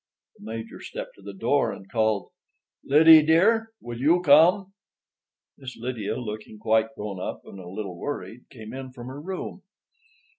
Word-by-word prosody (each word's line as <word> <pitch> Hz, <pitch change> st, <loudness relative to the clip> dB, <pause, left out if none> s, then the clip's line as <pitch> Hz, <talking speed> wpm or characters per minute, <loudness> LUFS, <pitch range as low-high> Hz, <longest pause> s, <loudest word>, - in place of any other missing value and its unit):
The -, -, -13 dB
Major 115 Hz, +1 st, -7 dB
stepped -, -, -7 dB
to -, -, -17 dB
the 100 Hz, +1 st, -8 dB
door 115 Hz, +3 st, +1 dB
and 95 Hz, -, -10 dB
called: 110 Hz, -2 st, 0 dB, 0.5 s
"Lydie, 155 Hz, +3 st, +8 dB
dear, 200 Hz, +9 st, +3 dB
will 120 Hz, -1 st, -7 dB
you 165 Hz, +6 st, +4 dB
come?" 180 Hz, +6 st, +5 dB, 0.9 s
Miss 130 Hz, -2 st, -9 dB
Lydia, 115 Hz, -3 st, -4 dB
looking 110 Hz, -2 st, -7 dB
quite 110 Hz, +1 st, +1 dB
grown 105 Hz, -2 st, -6 dB
up -, -, -6 dB
and 100 Hz, -, -11 dB
a 90 Hz, -, -10 dB
little 95 Hz, -2 st, -6 dB
worried, 125 Hz, -4 st, -6 dB
came 110 Hz, -1 st, -10 dB
in 130 Hz, -1 st, -8 dB
from 120 Hz, -2 st, -10 dB
her 140 Hz, +2 st, -8 dB
room. 185 Hz, +4 st, -6 dB
120 Hz, 160 wpm, -25 LUFS, 110-150 Hz, 0.9 s, Lydie